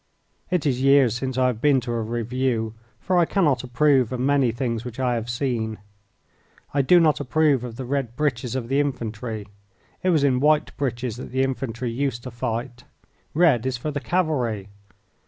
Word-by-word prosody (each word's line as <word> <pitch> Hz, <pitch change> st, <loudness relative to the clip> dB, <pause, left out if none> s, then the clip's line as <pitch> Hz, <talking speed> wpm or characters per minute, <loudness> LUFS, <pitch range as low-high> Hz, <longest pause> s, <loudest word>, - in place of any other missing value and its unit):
It 180 Hz, -4 st, 0 dB
is 130 Hz, -3 st, +1 dB
years 135 Hz, -4 st, +5 dB
since 130 Hz, 0 st, -3 dB
I 130 Hz, -, +3 dB
have 120 Hz, -3 st, 0 dB
been 145 Hz, -3 st, +4 dB
to 120 Hz, 0 st, -5 dB
a 115 Hz, -1 st, -1 dB
review, 115 Hz, 0 st, -1 dB, 0.3 s
for 185 Hz, -1 st, +1 dB
I 170 Hz, -, +5 dB
cannot 150 Hz, -, +1 dB
approve 130 Hz, -1 st, +2 dB
of 125 Hz, -, -3 dB
many 135 Hz, -2 st, +2 dB
things 115 Hz, -2 st, -2 dB
which 125 Hz, 0 st, -8 dB
I 125 Hz, -2 st, +1 dB
have 115 Hz, 0 st, -3 dB
seen. 115 Hz, -3 st, -2 dB, 1.0 s
I 140 Hz, -, +3 dB
do 175 Hz, +7 st, +5 dB
not 155 Hz, -3 st, +3 dB
approve 145 Hz, -1 st, +2 dB
of 120 Hz, -2 st, -6 dB
the 130 Hz, -, -6 dB
red 130 Hz, -3 st, -2 dB
breeches 130 Hz, -4 st, -1 dB
of 125 Hz, -3 st, -3 dB
the 135 Hz, +3 st, +1 dB
infantry. 115 Hz, -6 st, -3 dB, 0.5 s
It 185 Hz, -, +1 dB
was 160 Hz, -5 st, +3 dB
in 130 Hz, -3 st, +3 dB
white 150 Hz, +2 st, +2 dB
breeches 125 Hz, -4 st, -3 dB
that 130 Hz, -, -7 dB
the 130 Hz, +1 st, +1 dB
infantry 130 Hz, -2 st, -3 dB
used 120 Hz, -1 st, -2 dB
to 125 Hz, -, -7 dB
fight. 120 Hz, +1 st, -4 dB, 0.5 s
Red 145 Hz, -8 st, +4 dB
is 130 Hz, -2 st, -1 dB
for 150 Hz, +5 st, -4 dB
the 145 Hz, -, -3 dB
cavalry. 130 Hz, -, -1 dB
130 Hz, 190 wpm, -24 LUFS, 120-140 Hz, 1.0 s, years